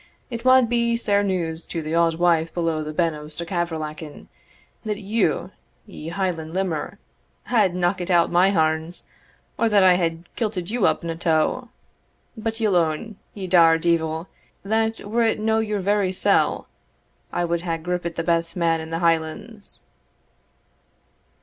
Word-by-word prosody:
It 235 Hz, -1 st, -5 dB
wad 255 Hz, -1 st, +6 dB
be 235 Hz, 0 st, +1 dB
sair 205 Hz, -3 st, +2 dB
news 175 Hz, -5 st, -2 dB
to 165 Hz, -2 st, -4 dB
the 155 Hz, +1 st, -4 dB
auld 165 Hz, -1 st, +2 dB
wife 165 Hz, -2 st, +2 dB
below 165 Hz, -3 st, 0 dB
the 155 Hz, -, -5 dB
Ben 165 Hz, +1 st, +1 dB
of 150 Hz, 0 st, -9 dB
Stuckavrallachan, 160 Hz, -2 st, -5 dB, 0.5 s
that 215 Hz, -2 st, -2 dB
you, 215 Hz, +3 st, 0 dB, 0.3 s
ye 155 Hz, -, -10 dB
Hieland 170 Hz, -3 st, -3 dB
limmer, 185 Hz, -5 st, -2 dB, 0.5 s
had 210 Hz, -7 st, +2 dB
knockit 180 Hz, 0 st, 0 dB
out 170 Hz, -2 st, +3 dB
my 180 Hz, +2 st, +4 dB
harns, 160 Hz, -1 st, 0 dB, 0.5 s
or 230 Hz, -, +3 dB
that 205 Hz, -2 st, +4 dB
I 185 Hz, -1 st, +7 dB
had 165 Hz, -1 st, -2 dB
kilted 205 Hz, -5 st, -3 dB
you 240 Hz, -4 st, +2 dB
up -, -, 0 dB
in 170 Hz, -, -3 dB
a -, -, -4 dB
tow. 165 Hz, +9 st, 0 dB, 0.7 s
But 225 Hz, 0 st, -4 dB
ye'll 215 Hz, -4 st, +2 dB
own, 170 Hz, +6 st, -1 dB, 0.2 s
ye 195 Hz, -2 st, -5 dB
dour 170 Hz, -3 st, +5 dB
deevil, 160 Hz, -1 st, 0 dB, 0.4 s
that 220 Hz, +2 st, 0 dB
were 225 Hz, +4 st, -1 dB
it 225 Hz, -1 st, +2 dB
no 220 Hz, +1 st, +1 dB
your 210 Hz, -2 st, -1 dB
very 200 Hz, -1 st, +1 dB
sell, 185 Hz, -, +1 dB, 0.6 s
I 175 Hz, -, 0 dB
wad 170 Hz, 0 st, -1 dB
hae 170 Hz, -2 st, -2 dB
grippit 170 Hz, 0 st, -3 dB
the 165 Hz, -, -2 dB
best 170 Hz, 0 st, 0 dB
man 165 Hz, -2 st, +1 dB
in 160 Hz, -, -8 dB
the 165 Hz, +1 st, -3 dB
Hielands." 165 Hz, +6 st, -2 dB
175 Hz, 160 wpm, -23 LUFS, 165-205 Hz, 0.7 s, I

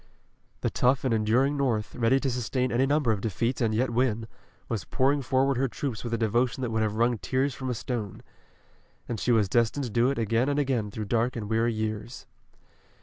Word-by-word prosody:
The -, -, 0 dB
tough 130 Hz, +1 st, +2 dB
and 130 Hz, -3 st, +1 dB
enduring 115 Hz, +6 st, +2 dB
North, 115 Hz, -7 st, 0 dB
ready 125 Hz, +3 st, +2 dB
to 135 Hz, -, 0 dB
sustain 125 Hz, +1 st, -1 dB
any 130 Hz, +3 st, +2 dB
number 145 Hz, -4 st, +2 dB
of 105 Hz, -3 st, -1 dB
defeats 115 Hz, +5 st, -1 dB
and 115 Hz, -2 st, +2 dB
yet 115 Hz, +3 st, 0 dB
win, 115 Hz, -2 st, 0 dB, 0.4 s
was 110 Hz, -4 st, -3 dB
pouring 140 Hz, +2 st, +1 dB
forward 135 Hz, +1 st, +1 dB
her 135 Hz, +1 st, +1 dB
troops 125 Hz, -2 st, -4 dB
with 120 Hz, -, -4 dB
a 115 Hz, -, +1 dB
devotion 120 Hz, +3 st, 0 dB
that 125 Hz, -3 st, -2 dB
would 110 Hz, 0 st, 0 dB
have 105 Hz, -1 st, 0 dB
wrung 120 Hz, 0 st, +1 dB
tears 135 Hz, +1 st, 0 dB
from 130 Hz, 0 st, -5 dB
a 125 Hz, -, -1 dB
stone. 110 Hz, -3 st, -4 dB, 0.8 s
And 115 Hz, -3 st, -3 dB
she 125 Hz, -, +1 dB
was 110 Hz, -4 st, +3 dB
destined 120 Hz, +7 st, +1 dB
to 120 Hz, -, -4 dB
do 120 Hz, +4 st, +3 dB
it 140 Hz, -, -2 dB
again 115 Hz, +4 st, +1 dB
and 145 Hz, -, 0 dB
again 130 Hz, -7 st, 0 dB
through 105 Hz, +1 st, -5 dB
dark 115 Hz, +4 st, 0 dB
and 110 Hz, -3 st, -4 dB
weary 115 Hz, +2 st, +1 dB
years. 110 Hz, +2 st, -4 dB
120 Hz, 210 wpm, -27 LUFS, 110-130 Hz, 0.8 s, was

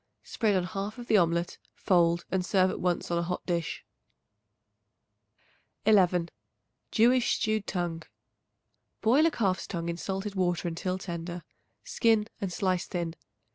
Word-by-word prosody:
Spread 215 Hz, -4 st, 0 dB
on 185 Hz, -, +2 dB
half 195 Hz, +4 st, -4 dB
of 240 Hz, -, -7 dB
the 220 Hz, -, +4 dB
omelet, 170 Hz, -1 st, +1 dB, 0.2 s
fold 170 Hz, -2 st, +2 dB
and 190 Hz, -1 st, +1 dB
serve 185 Hz, 0 st, +3 dB
at -, -, -5 dB
once 175 Hz, -1 st, -1 dB
on 170 Hz, -, +1 dB
a -, -, +1 dB
hot 180 Hz, +1 st, -3 dB
dish. 170 Hz, -2 st, -2 dB, 2.0 s
11. 180 Hz, -5 st, +4 dB, 0.6 s
Jewish 245 Hz, +2 st, +3 dB
Stewed 215 Hz, -2 st, -1 dB
Tongue. 175 Hz, -3 st, -2 dB, 1.0 s
Boil 270 Hz, +9 st, +5 dB
a -, -, +4 dB
calf's 190 Hz, -, -1 dB
tongue 170 Hz, -2 st, -3 dB
in 170 Hz, -, -3 dB
salted 195 Hz, +3 st, -4 dB
water 175 Hz, -2 st, 0 dB
until 180 Hz, +2 st, -2 dB
tender; 175 Hz, -2 st, -6 dB, 0.4 s
skin 225 Hz, -3 st, +2 dB
and 195 Hz, -2 st, -3 dB
slice 185 Hz, 0 st, 0 dB
thin. 170 Hz, -3 st, -3 dB
185 Hz, 140 wpm, -29 LUFS, 170-210 Hz, 2.0 s, Boil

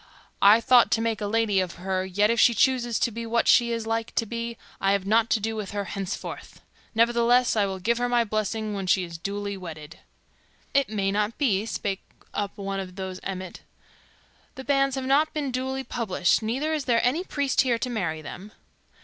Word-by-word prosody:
I 200 Hz, +2 st, +8 dB
had 230 Hz, -, -1 dB
thought 245 Hz, 0 st, +6 dB
to -, -, +2 dB
make 225 Hz, -2 st, -1 dB
a 205 Hz, -, -1 dB
lady 215 Hz, -2 st, +2 dB
of 185 Hz, -2 st, -2 dB
her; 185 Hz, +1 st, -2 dB
yet 205 Hz, +3 st, +2 dB
if 235 Hz, -, 0 dB
she 235 Hz, -, +5 dB
chooses 240 Hz, -1 st, +2 dB
to 235 Hz, -, +1 dB
be 230 Hz, +2 st, -5 dB
what 230 Hz, +1 st, +1 dB
she 235 Hz, -1 st, +5 dB
is 230 Hz, -1 st, -2 dB
like 225 Hz, 0 st, -2 dB
to 230 Hz, -, +1 dB
be, 235 Hz, +1 st, -5 dB, 0.2 s
I 195 Hz, 0 st, +2 dB
have 200 Hz, -1 st, -1 dB
nought 225 Hz, +3 st, +3 dB
to 225 Hz, -, +2 dB
do 220 Hz, +1 st, -3 dB
with 205 Hz, -2 st, -5 dB
her 205 Hz, -1 st, -2 dB
henceforth. 195 Hz, 0 st, -6 dB, 0.4 s
Ne'ertheless 235 Hz, +2 st, +3 dB
I 205 Hz, -2 st, +2 dB
will 190 Hz, -1 st, -4 dB
give 230 Hz, +6 st, 0 dB
her 245 Hz, 0 st, 0 dB
my 240 Hz, -1 st, +3 dB
blessing 215 Hz, 0 st, -2 dB
when 195 Hz, -2 st, -4 dB
she 185 Hz, +1 st, +3 dB
is 170 Hz, -2 st, -8 dB
duly 200 Hz, +3 st, -4 dB
wedded." 165 Hz, -3 st, -9 dB, 0.7 s
"It 275 Hz, -3 st, +2 dB
may 200 Hz, -2 st, 0 dB
not 210 Hz, +2 st, -1 dB
be," 220 Hz, -7 st, +1 dB
spake 200 Hz, -3 st, -3 dB, 0.3 s
up 205 Hz, 0 st, -3 dB
one 195 Hz, -1 st, -3 dB
of 185 Hz, -1 st, -7 dB
those 190 Hz, -1 st, -5 dB
of -, -, -18 dB
Emmet. 185 Hz, -2 st, -6 dB, 0.9 s
"The 265 Hz, -, -7 dB
banns 275 Hz, -1 st, +2 dB
have 265 Hz, -1 st, -3 dB
not 295 Hz, +4 st, +2 dB
been 285 Hz, -3 st, -2 dB
duly 265 Hz, +1 st, -2 dB
published, 215 Hz, -8 st, 0 dB
neither 265 Hz, +8 st, -1 dB
is 300 Hz, -4 st, -2 dB
there 235 Hz, -2 st, +2 dB
any 295 Hz, +9 st, +1 dB
priest 285 Hz, -7 st, +1 dB
here 245 Hz, -3 st, +1 dB
to 250 Hz, -, -3 dB
marry 165 Hz, -8 st, -2 dB
them." 195 Hz, +7 st, -9 dB
220 Hz, 215 wpm, -25 LUFS, 195-240 Hz, 0.9 s, I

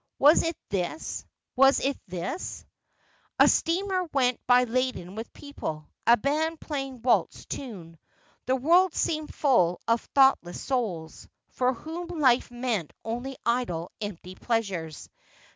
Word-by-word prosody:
' -, -, -57 dB
Was 295 Hz, +4 st, +6 dB
it 330 Hz, -1 st, -2 dB
this? 195 Hz, -, -3 dB, 0.3 s
was 270 Hz, +2 st, +6 dB
it 275 Hz, 0 st, 0 dB
this 185 Hz, -, -5 dB, 0.4 s
?' -, -, -37 dB
A -, -, +8 dB
steamer 370 Hz, +2 st, +1 dB
went 250 Hz, -3 st, +2 dB
by 250 Hz, 0 st, +6 dB
laden 250 Hz, -7 st, -2 dB
with 225 Hz, +2 st, -7 dB
people, 155 Hz, -, -7 dB, 0.2 s
a 235 Hz, +1 st, +7 dB
band 310 Hz, +6 st, 0 dB
playing 270 Hz, -3 st, -4 dB
a -, -, -14 dB
waltz 245 Hz, 0 st, +1 dB
tune. 175 Hz, -, -8 dB, 0.5 s
The 260 Hz, -, +3 dB
world 340 Hz, +7 st, +4 dB
seemed 310 Hz, -1 st, -1 dB
full 180 Hz, -, +2 dB
of 230 Hz, 0 st, +2 dB
thoughtless 265 Hz, -10 st, +4 dB
souls, 200 Hz, -12 st, -3 dB, 0.2 s
for 255 Hz, 0 st, +1 dB
whom 325 Hz, +7 st, -6 dB
life 285 Hz, -8 st, +2 dB
meant 240 Hz, -, -2 dB
only 245 Hz, +4 st, -4 dB
idle 210 Hz, -9 st, -1 dB
empty 185 Hz, -3 st, -6 dB
pleasures. 185 Hz, -, -3 dB
250 Hz, 140 wpm, -27 LUFS, 200-285 Hz, 0.5 s, A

